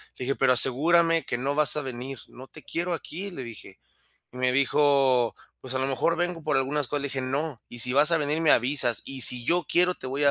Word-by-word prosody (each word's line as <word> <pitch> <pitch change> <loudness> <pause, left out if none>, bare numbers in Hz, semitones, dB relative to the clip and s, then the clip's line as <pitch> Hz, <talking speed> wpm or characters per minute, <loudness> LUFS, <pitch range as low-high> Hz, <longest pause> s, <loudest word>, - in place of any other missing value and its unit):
Le 125 - -6
dije: 135 +2 -1
"Pero 130 - +3
asegúrame 165 +6 +2
que 120 - -3
no 140 +3 -2
vas 150 -3 +6
a - - -1
venir, 130 0 -6
no 130 +1 -13
te 155 - -14
quiero 175 +1 -3
aquí", 185 +4 -6
le 135 -7 -7
dije. 110 -5 -11 0.5
Y - - -13
me 125 0 +1
dijo: 135 -3 +2 0.3
"Pues, 130 0 -7
a - - 0
lo 130 - 0
mejor, 135 +5 0
vengo 175 -1 -2
por 150 -2 0
algunas 135 +1 -1
cosas". 145 -1 -3
Le 140 - -3
dije: 135 -1 -4
"No, 135 +1 -3
y 120 - -8
si 125 +2 0
vas 145 +4 +3
a 165 - +3
venir, 150 +1 -1
me 160 - +3
avisas, 125 -1 +1
y 135 -1 -5
si 120 0 +4
yo 175 +5 +1
quiero 180 +1 +2
te - - -10
voy 140 +3 -1
a 140 - +5
140 Hz, 250 wpm, -26 LUFS, 130-155 Hz, 0.5 s, vas